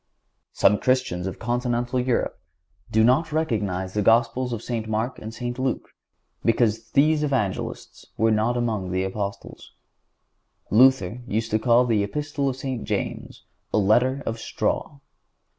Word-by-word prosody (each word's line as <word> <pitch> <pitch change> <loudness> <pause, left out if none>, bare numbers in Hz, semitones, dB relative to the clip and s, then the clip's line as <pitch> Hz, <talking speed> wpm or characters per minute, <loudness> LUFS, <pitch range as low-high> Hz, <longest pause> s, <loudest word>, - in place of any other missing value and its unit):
Some 105 +1 +3
Christians 125 -9 0
of 95 - -5
continental 120 +1 -1
Europe 125 -9 -1 0.5
do 110 0 +3
not 135 +8 +3
recognize 105 - -1
the 105 - 0
Gospels 115 +4 +2
of 115 -2 -4
St. 115 -3 -3
Mark 110 +4 -2
and 110 - -7
St. 120 +2 -5
Luke 130 -2 -2 0.5
because 115 -1 +1
these 150 +2 +4
Evangelists 130 -10 -3
were 110 +1 +3
not 110 +3 +1
among 110 -6 -1
the 95 +1 0
Apostles. 100 +1 -6 1.0
Luther 125 -2 +4
used 110 +1 -2
to 110 - +2
call 120 +2 +4
the 115 -4 +2
Epistle 145 +5 -2
of 130 - -3
St. 130 -2 -4
James - - -4 0.3
a - - +1
letter 125 +7 +3
of 115 0 -3
straw. 140 - -2
115 Hz, 140 wpm, -24 LUFS, 110-130 Hz, 1.0 s, these